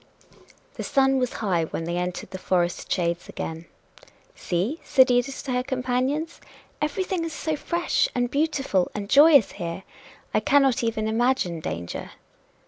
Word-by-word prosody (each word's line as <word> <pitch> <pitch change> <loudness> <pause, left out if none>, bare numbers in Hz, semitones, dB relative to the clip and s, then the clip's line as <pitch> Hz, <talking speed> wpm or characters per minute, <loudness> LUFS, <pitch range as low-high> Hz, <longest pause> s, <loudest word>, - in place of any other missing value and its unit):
The - - -4
sun 270 -1 +2
was 250 -1 -1
high 175 -5 +1
when 165 - -5
they 170 +1 -3
entered 180 +1 -4
the 185 - -6
forest 175 -2 -1
shades 170 -1 -1
again. 160 +1 -6 0.7
"See," 200 - -2
said 260 -1 +4
Edith 245 +2 0
to 275 - -4
her 250 0 +1
companions, 260 +4 -2 0.4
"everything 350 +4 -1
is 330 -1 -4
so 310 0 -2
fresh 340 +3 0
and 245 -1 0
beautiful 280 - +1
and 205 -1 -4
joyous 285 -1 +6
here! 170 0 -5 0.5
I - - +4
cannot 275 -3 +3
even 220 -1 -1
imagine 225 -7 +1
danger." 85 - -5
250 Hz, 145 wpm, -25 LUFS, 180-280 Hz, 0.7 s, joyous